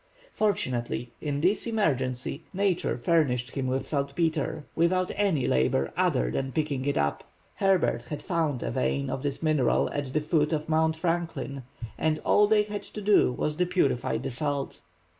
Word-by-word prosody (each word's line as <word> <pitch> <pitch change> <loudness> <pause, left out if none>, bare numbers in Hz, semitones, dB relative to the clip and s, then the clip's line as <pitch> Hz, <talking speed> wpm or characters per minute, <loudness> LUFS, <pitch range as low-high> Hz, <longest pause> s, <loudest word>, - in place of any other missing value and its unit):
Fortunately, 125 - -1
in 145 -2 -2
this 190 +7 +1
emergency, 140 - -1
Nature 195 -2 +1
furnished 125 -3 +1
him 135 -2 -2
with 130 +1 -1
saltpetre, 155 +1 -1
without 185 +2 +2
any 190 -11 +1
labor 65 - +1
other - - +1
than 135 - -2
picking 145 -3 -1
it 145 - 0
up. 70 0 0 0.3
Herbert 185 -11 +2
had 150 -1 -6
found 160 -8 -1
a - - -2
vein 65 +3 -1
of 135 - -3
this 145 +2 -3
mineral 155 -6 +2
at 140 -2 -3
the 155 - +1
foot 150 0 +1
of 155 0 -2
Mount 160 0 +2
Franklin, 165 -5 -2 0.4
and 155 -1 +1
all 210 0 +5
they 210 0 +4
had 210 -1 -5
to 210 - -9
do 205 -9 +4
was 150 +4 -2
to 180 - +1
purify 160 -9 +1
the - - -4
salt. 140 +2 -2
150 Hz, 165 wpm, -27 LUFS, 130-170 Hz, 0.4 s, all